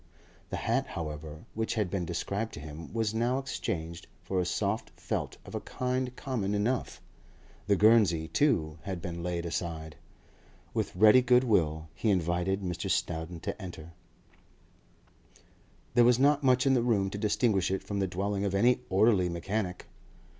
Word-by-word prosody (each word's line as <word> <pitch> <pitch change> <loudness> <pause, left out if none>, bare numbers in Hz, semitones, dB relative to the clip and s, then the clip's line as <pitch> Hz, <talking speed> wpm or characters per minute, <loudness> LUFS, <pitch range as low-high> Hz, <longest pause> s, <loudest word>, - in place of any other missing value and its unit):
The - - -3
hat, - - 0
however, 75 -1 -6
which 110 +2 -2
had 105 -6 0
been 95 -3 -1
described 100 +6 -3
to - - -7
him, 75 +2 -9
was 110 -2 -1
now 120 +3 +1
exchanged 85 -11 -4 0.2
for 95 - -1
a 90 - +1
soft 100 +4 -1
felt - - -3
of - - -11
a - - -2
kind 125 0 -2
common 110 -8 -2
enough; 115 +5 -1 0.7
the 100 - +4
guernsey, 100 -7 +4
too, 80 - +1
had 95 -3 -4
been 85 0 -5
laid 85 0 -2
aside. 80 -2 -4 0.8
With - - -2
ready 110 +6 +7
goodwill 105 -12 +2
he 110 - -1
invited 90 +1 +1
Mr. 90 -2 -3
Snowdon 80 +1 -2
to - - -5
enter. 85 -3 -8 2.0
There 120 0 +6
was 120 0 +5
not 145 +2 +4
much 130 -2 +3
in 135 - +4
the 125 - +3
room 105 -5 +1
to 100 - -5
distinguish 105 -2 +2
it 95 0 -2
from 100 -1 -3
the 95 - +1
dwelling 100 +2 -2
of 100 -1 -1
any 120 +5 +3
orderly 95 -2 +4
mechanic. 90 +2 -3
100 Hz, 160 wpm, -30 LUFS, 85-115 Hz, 2.0 s, ready